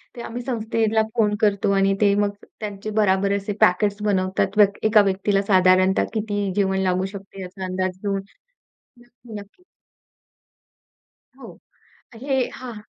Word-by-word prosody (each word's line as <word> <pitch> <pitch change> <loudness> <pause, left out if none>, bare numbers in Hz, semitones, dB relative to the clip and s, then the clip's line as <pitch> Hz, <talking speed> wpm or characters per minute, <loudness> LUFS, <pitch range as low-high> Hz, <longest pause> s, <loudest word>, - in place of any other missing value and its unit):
ते 240 - -7
आम्ही 240 +1 -6
संस्थेला 225 -2 0
फोन 210 -2 +2
करतो 200 -2 +2
आणि 195 0 +2
ते 200 -1 +4
मग 200 - 0 0.3
त्यांचे 210 0 -6
बराबर 195 -1 +2
असे 200 +1 -4
पॅकेट्स 200 +3 +2
बनवतात, 190 0 0
व्यक्ती 205 +1 +3
एका 215 -1 +6
व्यक्तीला 195 +1 0
साधारणतः 185 -1 +3
किती 205 -2 -2
जेवण 190 -1 +1
लागू 185 0 0
शकते 195 0 -10
याचा 185 +1 -7
अंदाज 185 0 -3
घेऊन. 195 -1 -1 0.8
नक्की, 240 -1 -18
नक्की. 205 - -17 1.8
हो, - - -12 0.6
हे 270 +4 -2 0.2
हां, 255 -2 -8
200 Hz, 135 wpm, -22 LUFS, 190-215 Hz, 1.8 s, एका